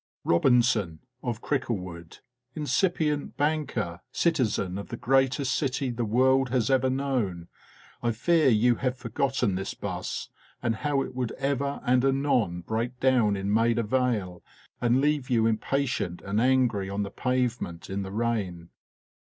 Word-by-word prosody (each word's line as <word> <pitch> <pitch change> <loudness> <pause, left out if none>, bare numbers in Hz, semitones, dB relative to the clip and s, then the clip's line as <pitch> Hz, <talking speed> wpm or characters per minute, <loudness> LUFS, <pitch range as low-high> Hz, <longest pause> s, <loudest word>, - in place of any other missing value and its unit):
Robinson, 110 - +2 0.2
of 120 -2 -4
Cricklewood, 90 - -3 0.3
incipient 155 -1 0
banker, 145 - -1
citizen 110 - 0
of 100 - -7
the 120 - -6
greatest 135 0 +2
city 135 -1 -1
the 120 0 -2
world 130 +4 +3
has 125 -1 +1
ever 130 0 +3
known, 125 -11 -2 0.5
I 120 - +1
fear 155 +6 +3
you 120 +1 +3
have 130 -1 -1
forgotten 125 -2 0
this 95 +1 -3
'bus, - - -4 0.3
and 115 -2 -1
how 145 +1 0
it - - -8
would 125 -2 -2
ever 140 +1 -2
and 125 0 +3
anon 135 -10 +1
break 115 +6 -3
down 125 -6 +3
in 100 +1 -1
Maida 115 +1 +2
Vale, 110 -7 -1 0.4
and 125 +2 +3
leave 145 -2 +1
you 115 -3 +3
impatient 115 -5 -1
and 100 +3 0
angry 120 -6 +2
on 100 +1 -2
the 100 - -6
pavement 125 -10 -2
in 95 +1 -3
the 95 0 -6
rain. 100 -6 -2
120 Hz, 145 wpm, -27 LUFS, 105-135 Hz, 0.5 s, world